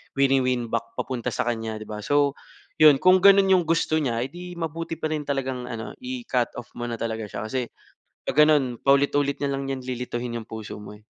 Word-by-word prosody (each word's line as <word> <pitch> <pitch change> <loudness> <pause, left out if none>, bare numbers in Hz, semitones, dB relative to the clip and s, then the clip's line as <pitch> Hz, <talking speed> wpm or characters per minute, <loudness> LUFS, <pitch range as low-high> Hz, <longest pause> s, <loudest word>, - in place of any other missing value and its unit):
wini-win 130 -3 +2
back 115 0 -2
papunta 125 -3 -4
sa - - -1
kanya, 115 -2 -2
'di 110 - -10
ba? 105 0 -5
So, 145 -1 +2 0.4
yun, 155 -2 +8
kung 185 0 +6
ganun 195 0 +6
yung 180 -2 +4
gusto 160 -1 +2
niya, 120 -5 -1
eh, 130 - -6
di 180 0 -8
mabuti 165 0 -4
pa 155 0 -3
rin 150 -2 -2
talagang 130 -3 -2
ano 115 -2 -6
i-cut 245 - -2
off 120 - -8
mo 120 - -3
na 120 - -3
talaga 110 -1 -3
siya. - - -6
Kasi 125 +3 -2 0.6
pag - - -4
ganun 135 -6 +2
paulit-ulit 140 0 +2
na 140 - 0
lang 135 0 -3
'yan, 135 -1 -4
lilituhin 125 -1 -4
yung 110 - -11
puso 110 -2 -7
mo 105 0 -10
eh. 105 - -19
135 Hz, 210 wpm, -25 LUFS, 120-155 Hz, 0.6 s, yun